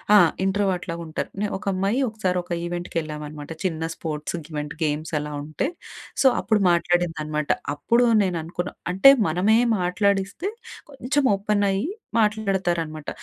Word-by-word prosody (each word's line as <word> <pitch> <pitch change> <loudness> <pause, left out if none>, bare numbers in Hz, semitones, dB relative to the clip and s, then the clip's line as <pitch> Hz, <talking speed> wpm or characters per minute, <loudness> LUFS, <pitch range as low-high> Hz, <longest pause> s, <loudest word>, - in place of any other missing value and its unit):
ఆ! - - +10 0.3
ఇంట్రోవర్ట్‌లాగా 190 -4 -1
ఉంటారు. 155 - -4 0.3
ఒక - - -13
అమ్మాయి 195 +7 0
ఒకసారి 190 -4 -1
ఒక 175 - -15
ఈవెంట్‌కెళ్ళామనమాట. 155 -4 -5
చిన్న 165 -4 -1
స్పోర్ట్స్ 155 0 -4 0.2
ఈవెంట్, 150 0 -4
గేమ్స్ 155 +2 -2
అలా 150 0 -5
ఉంటే, 155 - -2 0.6
సో, - - +7
అప్పుడు 215 -2 +2
మాట్లాడిందనమాట. 165 -4 0 0.3
అప్పుడు 235 +12 +3 0.2
నేను 180 -3 -1
అనుకున్నా. 175 +2 -4 0.2
అంటే 195 +9 +8 0.2
మనమే 185 +8 +3 0.2
మాట్లాడిస్తే, 195 - 0 0.4
కొంచెం 275 +1 0
ఓపెన్ 205 +1 0
అయ్యి 195 +10 -1 0.3
మాట్లాడతారనమాట. 185 -8 0
175 Hz, 125 wpm, -24 LUFS, 155-200 Hz, 0.6 s, ఆ